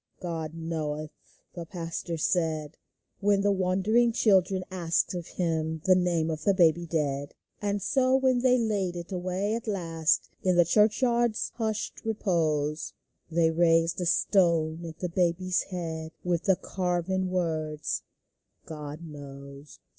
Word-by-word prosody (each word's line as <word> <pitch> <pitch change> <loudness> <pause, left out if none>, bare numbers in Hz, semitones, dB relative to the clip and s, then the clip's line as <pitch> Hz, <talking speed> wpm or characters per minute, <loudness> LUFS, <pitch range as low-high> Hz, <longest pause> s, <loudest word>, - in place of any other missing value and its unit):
" - - -43
God 165 -3 -4
knoweth," 155 -2 -3 0.4
the 170 - -6
pastor 170 -1 -4
said, 160 -2 0 0.4
When 200 -1 +3
the 205 0 +3
wondering 195 +5 +2
children 190 -4 +3
asked 170 -2 0
of 175 -1 -5
him 160 -2 -2
The 190 - +6
name 175 -3 +1
of 155 -1 -5
the 200 +1 +3
baby 170 -1 +3
dead. 145 -3 -2 0.3
And 205 -1 -1
so, 260 -1 +3
when 260 -2 +3
they 250 0 +4
laid 205 -6 0
it 175 +2 -7
away 185 +3 -1
at 230 0 -4
last 165 -6 0
In 185 -1 +2
the 175 -1 +5
church 210 - +3
yard's 240 -2 +1
hushed 220 -2 -3
repose, 160 -8 0 0.4
They 165 0 +2
raised 165 +1 +3
a 175 - 0
stone 170 -3 +2
at 160 0 -9
the 180 - -1
baby's 180 +1 +1
head, 165 -3 -5
With 175 -1 -1
the 190 - +5
carven 185 +1 -1
words, 155 - -2 0.3
" - - -47
God 150 0 -7
knows." 140 -2 -10
175 Hz, 145 wpm, -28 LUFS, 160-195 Hz, 0.4 s, The